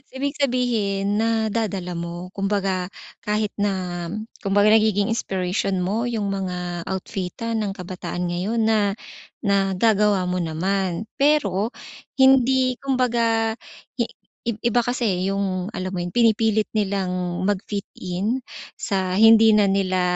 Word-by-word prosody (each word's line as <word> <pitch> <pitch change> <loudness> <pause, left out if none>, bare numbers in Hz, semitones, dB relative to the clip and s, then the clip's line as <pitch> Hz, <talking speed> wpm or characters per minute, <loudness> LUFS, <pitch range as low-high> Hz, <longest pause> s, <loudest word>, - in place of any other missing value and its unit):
ibig 280 +2 -2
sabihin 220 -7 0
nadadala 220 -5 -1
mo, 170 +1 -6
kumbaga 195 -2 0 0.4
kahit 210 0 0
na 205 0 +1 0.7
kumbaga 205 +1 +4
nagiging 215 -1 +3
inspiration 190 -3 -1
mo 210 +6 -1
'yung 220 -4 -2
mga 180 -3 -3
outfitan 195 +4 -3
ng 195 - -3
kabataan 180 -1 -5
ngayon 195 +7 -1
na 215 -2 +2 0.5
nagagawa 200 -1 +2
mo 180 - -1
naman, 180 +4 -1
pero 235 -8 +2 0.4
hindi 260 -1 +4
kumbaga, 235 -4 +1 0.4
hi 235 - +1 0.4
iba 235 +1 0
kasi 205 -6 0
'yung 195 0 -2
alam 185 -2 -4
mo 175 - -2
'yun 175 - -5
pinipilit 220 -1 +3
nilang 185 -3 -1
mag-fit 205 0 -2
in, 205 +8 -2 0.3
sa 190 -3 -1
hindi 225 0 +7
na 205 -2 +4
nila 185 -2 +1
200 Hz, 115 wpm, -23 LUFS, 185-225 Hz, 0.7 s, hindi